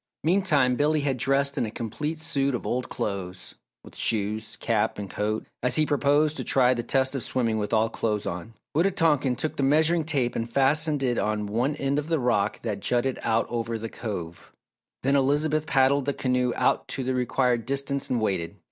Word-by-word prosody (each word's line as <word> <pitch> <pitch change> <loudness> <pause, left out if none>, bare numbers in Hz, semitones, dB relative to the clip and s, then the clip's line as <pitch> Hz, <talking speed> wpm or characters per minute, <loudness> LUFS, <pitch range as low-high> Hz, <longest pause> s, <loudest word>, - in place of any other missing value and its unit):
Meantime, 155 -7 +3
Billy 150 +3 +2
had 140 -2 0
dressed 140 +3 +1
in - - +1
a - - -4
complete 135 +8 -4
suit 140 -4 -1
of - - -5
old 125 +1 -2
clothes 95 -3 -5 0.3
with - - -14
shoes, 110 0 0
cap 110 -3 0
and 100 -2 -6
coat 105 +1 -2 0.2
as 125 0 +2
he 155 - +5
proposed 145 +1 +2
to - - -4
try 130 -1 +4
the 120 - -2
test 130 +3 +1
of 135 - -2
swimming 115 -4 -1
with 105 - -3
all 110 0 +3
clothes 105 -2 -2
on. 90 +6 -6 0.2
Wita 170 +5 +4
tonkan 150 -8 +2
took 155 - -3
the - - -1
measuring 160 +4 +3
tape 140 -6 0
and 115 0 -3
fastened 145 +3 +2
it 125 -2 +1
on 105 0 -1
one 120 +8 -1
end 140 0 0
of 150 - -5
the 165 -1 +1
rock 120 -5 0
that 105 -4 -3
jutted 125 +5 0
out 115 0 +1
over 115 -1 -3
the 115 +1 -6
Cove, 90 -9 -6 0.5
then 140 +2 +2
Elizabeth 150 +3 +2
paddled 135 -2 +3
the 140 - 0
canoe 125 -2 0
out - - +1
to 135 - -4
the 130 +1 -1
required 125 -2 0
distance 140 0 -1
and 125 - +1
waited. 95 -6 -2
130 Hz, 200 wpm, -26 LUFS, 115-145 Hz, 0.5 s, he